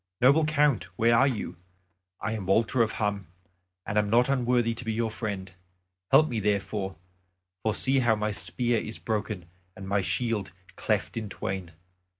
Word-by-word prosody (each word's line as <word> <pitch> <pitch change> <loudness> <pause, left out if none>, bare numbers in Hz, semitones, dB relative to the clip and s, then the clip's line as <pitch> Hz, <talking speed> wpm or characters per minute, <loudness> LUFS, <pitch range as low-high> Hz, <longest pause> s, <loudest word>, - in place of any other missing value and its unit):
"Noble 140 +5 +5
Count, 150 - +2
where 115 +1 +4
are 135 +4 +5
you? 115 -9 -3 0.6
I 100 +3 -2
am 105 -4 -4
Walter 115 +5 +3
of 110 -2 +1
Hum, 100 -4 -2 0.6
and 105 - +1
am 105 -1 0
not 120 +4 +4
unworthy 120 -3 +2
to 115 - -7
be 115 - -2
your 115 0 -1
friend. 100 -5 -5 0.6
Help 155 - +6
me 115 -5 -2
therefore. 100 -2 -1 0.7
For 110 0 0
see 135 0 +3
how 120 -3 +3
my 105 0 -1
spear 105 +6 0
is 110 - -6
broken 105 -4 -3 0.3
and 95 0 -8
my 100 0 +1
shield 105 -4 -2 0.2
cleft - - -1
in 110 -2 -3
twain. 95 -3 -5
110 Hz, 165 wpm, -27 LUFS, 100-120 Hz, 0.7 s, Help